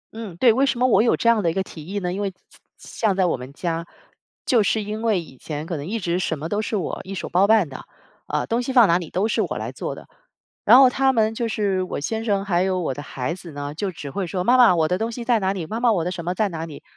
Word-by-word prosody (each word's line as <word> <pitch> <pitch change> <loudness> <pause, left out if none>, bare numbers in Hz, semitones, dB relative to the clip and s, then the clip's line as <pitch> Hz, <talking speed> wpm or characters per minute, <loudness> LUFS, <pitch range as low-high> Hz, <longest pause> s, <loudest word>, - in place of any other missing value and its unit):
嗯， 215 -7 -7
对， 235 +2 +5
为 260 +4 +2
什 260 - 0
么 255 - +3
我 240 - +4
有 230 - +3
这 - - -1
样 230 -2 +5
的 170 - +1
一 - - -2
个 190 - 0
提 160 -3 -11
议 200 - -4
呢？ 180 -3 -2
因 195 - -3
为 200 -1 -1 0.5
像 215 -4 -1
在 190 -1 +2
我 175 - +1
们 125 +1 -9
家， 165 +2 -3 0.6
就 235 -4 +4
是 215 +1 +1
因 210 +2 -5
为 220 -5 +2
以 155 -6 -11
前 150 -1 -5
可 170 - -4
能 145 +1 -5
一 225 - -2
直 175 -1 -1
什 160 -4 -1
么 155 - -5
都 210 +1 0
是 220 - -3
我 195 - -3
一 195 +1 -7
手 - - -5
包 185 +3 +3
办 215 -6 +4
的。 130 - -10 0.4
呃， - - -1
东 235 +2 0
西 255 - -3
放 240 -5 +7
哪 170 +2 +3
里 165 - -7
都 195 +4 0
是 - - 0
我 - - -2
来 - - -4
做 - - -5
的， - - -13 0.6
然 - - +8
后 265 -1 +8
他 265 +1 +2
们 220 -2 +2
就 230 +1 -2
是 200 -4 0
我 185 - -4
先 220 +9 -3
生 200 -3 0
还 180 -3 +1
有 185 -1 0
我 155 -6 -2
的 145 - -7
孩 135 +2 -4
子 175 -2 -10
呢， 145 0 -5
就 190 +5 -3
只 145 -4 -8
会 195 +2 -3
说 180 +1 -2
妈 245 +5 +4
妈， 235 -7 +7
我 160 -2 +2
的 180 - 0
东 225 +1 -2
西 235 0 -6
在 235 -2 +3
哪 190 -1 0
里？ 185 -4 -4
妈 220 +8 -4
妈 240 -1 +3
我 175 -6 0
的 180 - -1
什 170 -2 -5
么 180 - -1
在 215 +1 +1
哪 165 -1 -5
里， 145 - -11
190 Hz, 325 characters per minute, -22 LUFS, 170-225 Hz, 0.6 s, 然